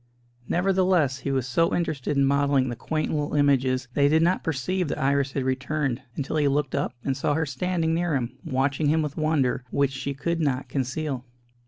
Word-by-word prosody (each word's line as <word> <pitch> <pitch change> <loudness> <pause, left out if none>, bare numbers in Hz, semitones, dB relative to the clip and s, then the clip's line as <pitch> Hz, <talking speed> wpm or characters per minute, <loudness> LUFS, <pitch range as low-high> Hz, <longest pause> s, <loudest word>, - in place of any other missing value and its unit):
Nevertheless, 180 -7 +2
he 140 - -3
was 130 -2 0
so 165 +7 +2
interested 150 -4 -1
in 140 - +4
modelling 140 -1 +2
the 120 - -3
quaint 155 +6 -2
little 150 -1 -1
images 135 -3 +2
that 145 - 0
he 140 - +6
did 160 +2 +4
not 180 +2 +2
perceive 165 +4 -1
that - - -3
Iris 140 0 +1
had 135 - -1
returned, 130 0 -1
until 145 +2 -2
he 145 -2 +3
looked 140 -1 0
up, 140 - -1
and 135 - 0
saw 145 +2 0
her 160 +1 +1
standing 160 +4 -1
near 170 -2 0
him, 125 -1 -2
watching 135 +3 0
him 155 +2 +3
with 150 -1 -4
wonder, 155 -5 +1
which 140 -1 +1
she 135 +1 -4
could 170 +4 -2
not 135 -3 0
conceal. 135 0 -2
140 Hz, 200 wpm, -25 LUFS, 135-155 Hz, -, he